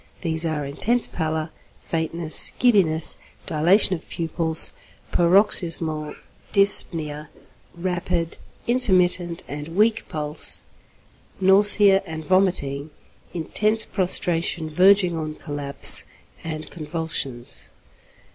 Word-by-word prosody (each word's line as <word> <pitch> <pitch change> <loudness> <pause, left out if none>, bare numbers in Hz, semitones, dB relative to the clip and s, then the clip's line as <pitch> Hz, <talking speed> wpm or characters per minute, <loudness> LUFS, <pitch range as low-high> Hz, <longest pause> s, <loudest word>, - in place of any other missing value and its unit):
These 165 -1 -2
are 150 -2 -4
intense 230 - 0
pallor, 160 -1 -5 0.3
faintness, 160 0 -1
giddiness, 180 -10 +4 0.3
dilatation 175 +6 +2
of 170 - -8
pupils, 165 -1 +4 0.4
paroxysmal 170 -4 +1 0.4
dyspnoea, 160 -7 +2 0.5
rapid, 175 -1 -4 0.3
intermittent, 180 -8 -1
and 150 +3 -9
weak 215 +2 0
pulse, 150 0 -1 0.8
nausea 195 +1 +4
and 160 -1 -8
vomiting, 160 -6 -1 0.5
intense 215 +6 -2
prostration 175 -3 +1
verging 185 +1 +2
on 155 -1 -6
collapse, 145 -3 +2 0.4
and 155 -1 -8
convulsions. 155 -6 -6
165 Hz, 85 wpm, -21 LUFS, 155-190 Hz, 0.8 s, giddiness